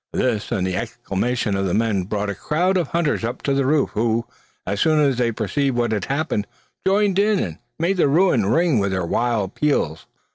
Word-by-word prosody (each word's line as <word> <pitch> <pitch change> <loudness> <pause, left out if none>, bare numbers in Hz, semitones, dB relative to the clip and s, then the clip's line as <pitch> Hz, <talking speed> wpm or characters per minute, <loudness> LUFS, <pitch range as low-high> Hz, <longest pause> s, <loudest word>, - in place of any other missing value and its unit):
This 115 -5 -1
and 90 - 0
the 95 -1 -1
exclamations 105 +3 -2
of 95 0 0
the 90 - 0
men 110 -4 +1
brought 105 0 -2
a - - -3
crowd 175 - 0
of 175 -5 +1
hunters 165 -6 0
up 120 +2 -4
to 140 - +1
the 135 -1 +1
roof, 150 0 +2
who, 115 +1 0 0.4
as 100 +1 -2
soon 155 -1 +3
as 140 -4 +2
they 120 -2 +2
perceived 120 +4 -1
what 120 -2 +1
had 105 -4 -1
happened, 135 -8 -1 0.4
joined 200 0 +3
in, 210 0 +3
and 85 - -3 0.2
made 175 +4 0
the 170 - +4
ruin 140 - +3
ring 160 - +3
with 100 -1 0
their 95 -2 -1
wild 110 0 0
peals. 85 - -1
120 Hz, 210 wpm, -21 LUFS, 100-155 Hz, 0.4 s, the